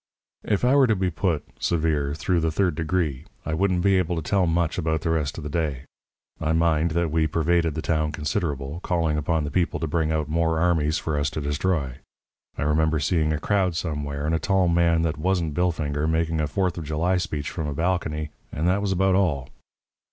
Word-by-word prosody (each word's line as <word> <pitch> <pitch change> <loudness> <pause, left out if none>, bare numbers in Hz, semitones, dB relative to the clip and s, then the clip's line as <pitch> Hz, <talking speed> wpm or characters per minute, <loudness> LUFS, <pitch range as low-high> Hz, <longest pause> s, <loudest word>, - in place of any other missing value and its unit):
"If 105 +2 +1
I 130 +3 +4
were 135 -2 +6
to 110 - +3
be 95 -1 0
put, 85 -2 -1 0.2
severe, 75 -4 0
through 85 +3 0
the 80 0 +1
third 90 +1 +1
degree, 80 -4 -1 0.2
I 80 - -2
wouldn't 90 +1 +1
be 95 -1 +4
able 90 -1 -1
to 80 - -3
tell 95 +2 +2
much 85 0 0
about 80 -2 0
the 80 - 0
rest 75 -2 -1
of 80 - -6
the 75 - -4
day. 75 -5 -2 0.5
I 80 0 0
mind 80 0 +2
that 85 -2 +1
we 80 0 +2
pervaded 80 0 +1
the 80 - -3
town 80 -2 0
considerable, 75 -2 -3
calling 85 -4 0
upon 75 +1 0
the 75 - -4
people 85 +2 0
to - - -1
bring 80 0 0
out 80 -1 0
more 80 +1 +1
armies 80 -2 +2
for 75 -2 -2
us 70 0 0
to 75 - -5
destroy. 75 -2 -1 0.6
I - - -1
remember 80 +1 +2
seeing 75 +1 +1
a 75 - -1
crowd 95 -2 +1
somewhere, 75 -3 -3
and 80 - 0
a 80 - +1
tall 95 -2 +2
man 85 -1 +3
that 80 -2 -1
wasn't 85 -2 0
Billfinger 75 -3 0
making 80 0 0
a 75 - 0
Fourth 90 +3 -1
of - - -5
July 80 +5 0
speech 75 -5 -3
from 80 -4 -3
a 75 - -2
balcony. 80 -3 -1 0.2
And 80 +4 -1
that 95 +3 +2
was 100 -1 -1
about 95 +1 +2
all. 80 -9 +1
80 Hz, 215 wpm, -24 LUFS, 75-90 Hz, 0.6 s, were